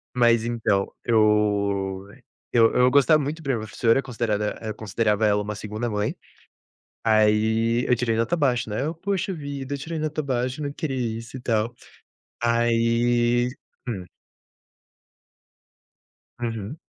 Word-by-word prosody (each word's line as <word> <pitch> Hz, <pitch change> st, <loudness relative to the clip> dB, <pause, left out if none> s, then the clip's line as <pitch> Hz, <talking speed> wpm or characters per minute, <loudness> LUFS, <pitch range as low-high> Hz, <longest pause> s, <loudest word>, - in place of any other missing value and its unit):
Mas, 120 Hz, -2 st, +4 dB
então, 110 Hz, -4 st, 0 dB
eu 100 Hz, -3 st, +1 dB, 0.4 s
eu 115 Hz, -2 st, +5 dB
eu 125 Hz, 0 st, +5 dB
gostava 145 Hz, +3 st, +5 dB
muito 155 Hz, +4 st, -4 dB
da 140 Hz, -, -5 dB
minha 125 Hz, -4 st, +1 dB
professora. 115 Hz, +3 st, +1 dB
Considerada 115 Hz, -5 st, -2 dB
eu 110 Hz, -1 st, -4 dB
considerava 110 Hz, +1 st, 0 dB
ela 105 Hz, -1 st, +3 dB
uma 105 Hz, +1 st, -4 dB
2ª 110 Hz, +3 st, -4 dB
mãe. 105 Hz, -1 st, -1 dB, 0.9 s
Aí, 110 Hz, +2 st, +3 dB
eu 125 Hz, -, +3 dB
tirei 115 Hz, -1 st, 0 dB
nota 115 Hz, +8 st, +1 dB
baixa, 125 Hz, -7 st, +1 dB
né. 105 Hz, -, -2 dB
Eu: 160 Hz, -, -2 dB
“Poxa 190 Hz, +2 st, -2 dB
vida. 140 Hz, -3 st, -5 dB
Eu -, -, -2 dB
tirei 160 Hz, +4 st, -5 dB
nota 155 Hz, 0 st, -2 dB
baixa. 130 Hz, +1 st, -2 dB
Não 145 Hz, -1 st, -2 dB
queria 140 Hz, -2 st, -3 dB, 0.2 s
isso”, 115 Hz, +3 st, -10 dB
e -, -, -5 dB
tal. 115 Hz, -1 st, 0 dB, 0.7 s
Aí 120 Hz, +1 st, +2 dB, 0.4 s
hum. 100 Hz, -6 st, -3 dB, 2.4 s
Uhum. 115 Hz, +3 st, -4 dB
115 Hz, 135 wpm, -24 LUFS, 110-130 Hz, 2.4 s, eu